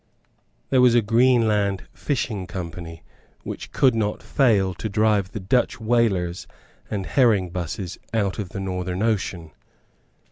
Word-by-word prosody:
There 130 -2 +5
was 125 -1 +5
a 120 - +4
Greenland 110 -4 +2
Fishing 110 -9 -2
Company 85 -3 -7 0.4
which - - -7
could 130 -3 +3
not 105 -2 -2
fail 105 -9 +2
to 110 +5 -5
drive 105 -2 +1
the 110 - -5
Dutch 110 +7 +1
whalers 110 -7 0 0.4
and 100 -3 -3
herring 105 - +2
busses 90 +1 -5
out 105 -4 -1
of 100 -4 -4
the 100 - -6
Northern 90 0 -3
Ocean. 95 -7 -1
100 Hz, 135 wpm, -23 LUFS, 90-115 Hz, 0.4 s, There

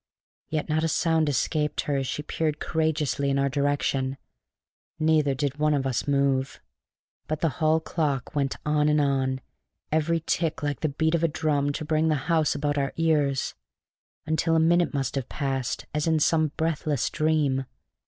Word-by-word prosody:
Yet 155 -1 -2
not 155 0 0
a - - +2
sound 160 -1 +2
escaped 150 +2 0
her 145 - -2
as 135 -1 -2
she 150 - -3
peered 150 0 -2
courageously 155 -3 0
in 135 - +1
our 140 0 +2
direction; 140 -1 0 0.8
neither 155 -3 +2
did 145 +1 -2
one 150 0 +3
of 135 -1 -1
us 130 +1 -1
move; 140 -1 +1 0.7
but 155 0 -3
the 165 - +3
hall 155 +1 +4
clock 150 -5 -2
went 140 -2 0
on 150 0 +2
and 150 0 +3
on, 135 -2 +1 0.5
every 160 +2 +1
tick 160 -1 -1
like 145 -3 -1
the 155 - 0
beat 160 +3 0
of 170 -1 +1
a - - +5
drum 145 -2 0
to 155 - -4
bring 155 +1 +1
the 155 - +3
house 160 -4 +2
about 145 0 0
our 135 -1 -1
ears, 150 -5 +1 0.7
until 160 +1 +1
a - - +4
minute 170 +2 +3
must 135 -3 -2
have 135 -3 -3
passed 135 -3 -2
as 150 +1 -1
in 160 -1 +3
some 155 +1 +3
breathless 155 -4 0
dream. 150 -4 +1
150 Hz, 175 wpm, -26 LUFS, 140-160 Hz, 0.8 s, a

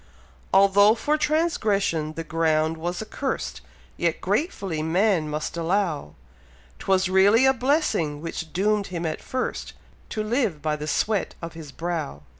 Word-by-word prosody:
Although 200 +2 +6
for 295 +6 0
transgression 215 - 0
the 165 - -5
ground 160 0 +1
was 175 +5 -3
accursed, 265 +5 -4 0.4
Yet - - 0
gratefully 195 - -1
man 170 0 +2
must 150 +2 -3
allow, 170 - -1 0.6
'Twas 190 -1 +2
really 200 +6 +5
a 265 - +5
blessing 250 - 0
which 165 0 -6
doom'd 205 +2 +1
him 170 -2 -4
at 155 -1 -3
first, 255 0 -4 0.4
To 215 - -2
live 220 - 0
by 150 +1 -1
the 150 0 -6
sweat 205 +6 0
of 170 -1 -7
his 160 -3 -9
brow. 160 - -4
180 Hz, 140 wpm, -24 LUFS, 160-215 Hz, 0.6 s, Although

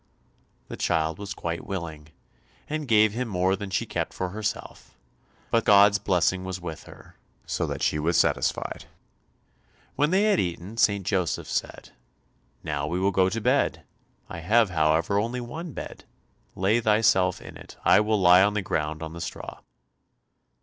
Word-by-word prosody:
The - - -8
child 80 0 0
was 100 0 -6
quite 85 0 -4
willing, 80 -6 -6 0.6
and 155 -1 -4
gave 110 -2 +4
him 125 +2 -3
more 95 -2 +1
than 100 0 -7
she 95 - -1
kept - - -4
for 95 - -3
herself, 105 +3 -6 0.5
but 115 -1 +2
God's 100 0 +6
blessing 95 0 +1
was 95 -1 -5
with 80 -2 -8
her, - - -15 0.3
so - - -2
that - - -4
she 75 - +1
was 80 +2 +1
satisfied. - - 0 1.1
When 150 +1 +2
they 190 +4 +3
had 210 -3 +3
eaten, 90 +5 -4
St. 100 -4 +2
Joseph 90 -6 -1
said, - - -4 0.7
"Now 75 -1 -2
we 85 +4 -2
will 95 +1 +2
go 95 0 +3
to 115 - -3
bed; 105 - +1 0.4
I 85 - -7
have, 105 +5 +3
however, 80 +4 +2
only 120 +4 -2
one 155 +8 -7
bed, - - -8 0.5
lay 100 +5 +2
thyself 105 -4 +3
in - - -11
it. - - -13
I - - +6
will 105 0 +1
lie 90 0 +7
on 105 +1 +2
the 105 - -1
ground 80 -2 -2
on 80 0 -7
the 85 - -8
straw." 85 - -7
95 Hz, 165 wpm, -25 LUFS, 85-110 Hz, 1.1 s, lie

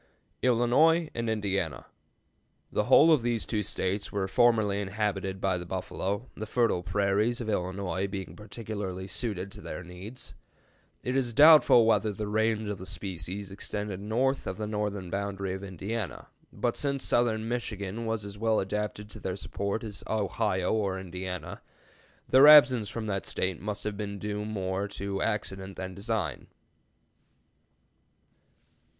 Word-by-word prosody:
ILLINOIS 140 +7 +4
AND 115 -1 -2
INDIANA. 100 -6 -1 0.9
The - - +1
whole 160 +2 +7
of 150 - +3
these 120 -1 0
two 110 -2 -1
States 100 0 -2
were 100 -2 -1
formerly 110 -2 +3
inhabited 95 -1 -2
by 95 -2 0
the 90 - -7
buffalo, 95 +4 -3
the 110 - -5
fertile 115 -6 +2
prairies 100 +6 +1
of 120 - -4
Illinois 95 -1 -1
being 95 -1 -6
particularly 100 -3 -5
suited 100 -2 -3
to 105 -1 -8
their 90 - -6
needs. 90 +8 -8 0.7
It 125 - -1
is 125 -3 +1
doubtful 150 -4 +8
whether 110 -1 +3
the 105 +1 -4
range 110 0 +1
of 105 -2 -4
the 95 - -7
species 95 +1 -5
extended 105 0 -4
north 125 +6 0
of 95 - -3
the 110 - -3
northern 105 -4 -3
boundary 100 -1 -2
of 95 +1 -6
Indiana, 100 +2 -5 0.2
but 120 -1 -1
since 140 -2 -1
southern 115 -2 +1
Michigan 115 -2 -3
was 110 -2 -2
as 100 0 -8
well 110 -1 +2
adapted 105 +1 -3
to - - -9
their 95 -1 -3
support 100 +2 -3
as 105 -3 -7
Ohio 100 -3 0
or 100 -3 0
Indiana, 90 -2 -6 0.7
their 135 +3 +7
absence 135 -8 +8
from 115 0 -4
that 100 -2 -2
State 90 -3 -2
must 105 +1 -4
have 105 -1 -3
been 100 -1 -4
due 105 +1 -3
more 100 -2 -2
to 100 -1 -4
accident 95 -3 -2
than 95 0 -5
design. 100 - -3
105 Hz, 150 wpm, -29 LUFS, 95-115 Hz, 0.9 s, doubtful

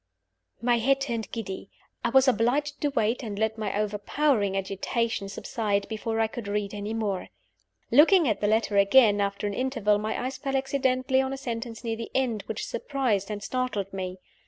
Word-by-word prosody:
My 240 -1 +3
head 270 +4 +3
turned 235 -5 -3
giddy. 195 -4 -5 0.3
I 235 - +2
was 265 +2 +5
obliged 260 +5 +1
to 295 - +2
wait 230 -2 0
and 210 -5 -5
let 220 +1 0
my 210 -1 -1
overpowering 210 0 +1
agitation 200 +2 -2
subside, 200 0 -2
before 225 0 -2
I 225 - +4
could 220 -1 -6
read 205 0 -2
any 205 +2 -4
more. 205 -5 -2 0.6
Looking 320 +6 +6
at 215 -3 0
the 205 - +2
letter 215 -1 +2
again, 205 +1 +6
after 200 +1 -1
an 205 - -1
interval, 235 -4 +1
my 215 +1 -2
eyes 260 - -4
fell 270 -1 -1
accidentally 265 -1 +1
on 265 0 -2
a - - -4
sentence 235 -3 -5
near 225 -1 -2
the 230 - -6
end, 245 -5 +1
which 220 - -3
surprised 235 -6 -1
and 205 -1 -4
startled 215 -6 -2
me. 185 -1 -4
225 Hz, 180 wpm, -27 LUFS, 205-255 Hz, 0.6 s, Looking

